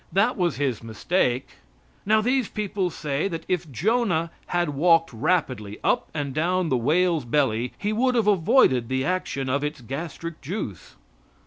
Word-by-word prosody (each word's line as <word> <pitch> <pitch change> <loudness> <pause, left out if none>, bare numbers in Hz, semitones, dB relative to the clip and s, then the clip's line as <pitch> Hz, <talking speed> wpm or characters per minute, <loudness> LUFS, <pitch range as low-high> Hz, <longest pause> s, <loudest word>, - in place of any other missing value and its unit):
That 200 +8 +2
was 175 -4 0
His 135 -5 -1
mistake. 125 - -1 0.5
Now, 215 +1 +4
these 250 0 +1
people 200 -3 -2
say 150 0 -2
that 165 -3 -5
if 175 -3 -1
Jonah 175 - +1 0.2
had 175 -2 0
walked 165 +1 +3
rapidly 125 - -1
up - - +1
and 145 -3 -3
down 175 +3 +1
the 130 - +2
whale's 165 +6 +2
belly 120 -2 0
he 210 +1 -1
would 250 +3 +2
have 230 -3 +2
avoided 185 - +4
the 130 0 0
action 160 -7 -2
of 140 +2 0
its 150 0 -3
gastric 160 +6 -6
juice. 145 - -6
165 Hz, 155 wpm, -24 LUFS, 135-185 Hz, 0.5 s, Now